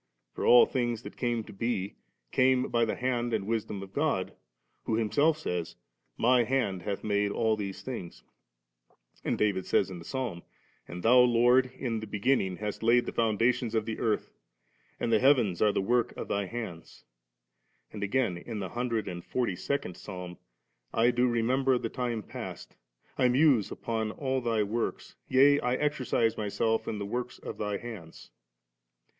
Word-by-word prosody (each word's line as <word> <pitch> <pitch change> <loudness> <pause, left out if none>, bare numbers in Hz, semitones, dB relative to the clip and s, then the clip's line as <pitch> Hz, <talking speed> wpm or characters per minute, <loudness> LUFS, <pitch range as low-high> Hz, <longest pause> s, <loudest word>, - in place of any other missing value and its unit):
for - - -5
all 120 - +8
things 120 -3 -2
that - - -9
came 120 -2 -1
to - - -12
be, 100 -2 -2 0.4
came 130 0 +3
by 120 0 +2
the 115 - 0
Hand 120 -2 -1
and 100 -3 -2
Wisdom 105 -2 -2
of 95 0 -12
God, 140 -11 0 0.5
who 110 - 0
Himself 145 +8 +2
says, 90 - -3 0.2
' - - -48
My 125 -1 +5
hand 115 -7 0
hath 100 +2 -4
made 105 -1 +1
all 110 +1 +1
these 100 -2 -5
things';' 90 - -7 1.0
and - - 0
David 100 -3 0
says - - +2
in 90 - -7
the - - -10
Psalm, 120 -7 -4 0.5
'And 90 +1 -7
Thou, 125 +3 +6
Lord, 125 +1 +5
in 115 -4 -2
the 110 - -7
beginning 100 -2 +1
hast 105 -1 -4
laid 120 +2 +4
the - - -4
foundations 115 +1 +1
of 110 -1 +1
the 110 -1 -4
earth, 110 -2 -1 0.7
and 115 - 0
the 110 - +5
heavens 120 -9 +3
are 105 - +5
the 95 - -1
work 120 +3 +1
of - - -5
Thy 100 -1 -1
hands";' 110 -7 -7 0.9
and 105 - -6
again, 100 -3 0
in 110 +4 -6
the 95 -3 -4
hundred 120 -3 -2
and 85 -2 -5
forty 120 -7 -1
second 95 -1 -3
Psalm, 90 -1 -8 0.3
' - - -46
I 120 - +5
do 125 +1 +2
remember 125 +3 +2
the 115 - -3
time 120 -3 -3
past, - - -8 0.4
I 125 - +5
muse 130 - +4
upon 110 -2 -3
all 130 -2 -1
Thy 115 -3 +1
works, 110 +3 -3
yea 140 +2 +6
I 125 -1 0
exercise 130 -6 0
myself 110 +2 0
in 110 - -2
the 100 - -4
works 120 +4 -4
of - - -8
Thy 105 -1 -1
hands^. 100 - -10
115 Hz, 175 wpm, -29 LUFS, 100-125 Hz, 1.0 s, all